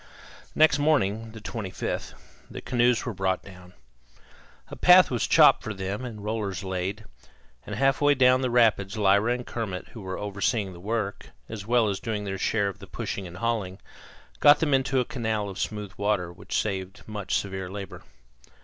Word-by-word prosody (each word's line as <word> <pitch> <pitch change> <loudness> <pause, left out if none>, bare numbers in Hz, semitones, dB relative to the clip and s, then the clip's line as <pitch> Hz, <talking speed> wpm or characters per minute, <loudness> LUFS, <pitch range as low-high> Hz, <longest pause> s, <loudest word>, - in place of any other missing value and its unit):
Next 155 -2 +5
morning, 115 -7 +1
the 110 - -10
25th, 105 -3 -5 0.3
the - - -7
canoes 120 -1 +1
were 120 - -3
brought 95 -1 -1
down. 90 -2 -14 1.0
A - - -7
path 180 -2 +6
was 120 -3 0
chopped - - +6
for 110 - -5
them 95 +5 -4
and 110 -4 -8
rollers 105 -2 -3
laid; 95 +3 -3 0.6
and - - -4
half 135 +1 +2
way 145 0 +5
down 130 0 +4
the 130 - 0
rapids 110 -4 +2
Lyra 100 +3 +3
and 125 0 -5
Kermit, 100 -6 -5
who 115 - -10
were 95 -1 -5
overseeing 100 0 -1
the 85 - -12
work 105 +1 -3 0.2
as 105 -2 -7
well 120 -2 +3
as 100 -2 -2
doing 110 -3 -3
their 95 -1 -4
share 100 0 +1
of 100 - -6
the - - -11
pushing 95 -2 -5
and 85 +1 -10
hauling, 105 -4 -2 0.6
got 145 0 +7
them 155 -3 +1
into 135 0 +2
a 125 - +1
canal 110 -7 -2
of 95 0 -8
smooth 105 -2 -4
water, 100 -4 -1
which 90 - -3
saved 95 -1 -4
much 105 -3 -3
severe 95 -2 -3
labor. 100 0 -7
105 Hz, 180 wpm, -26 LUFS, 95-120 Hz, 1.0 s, got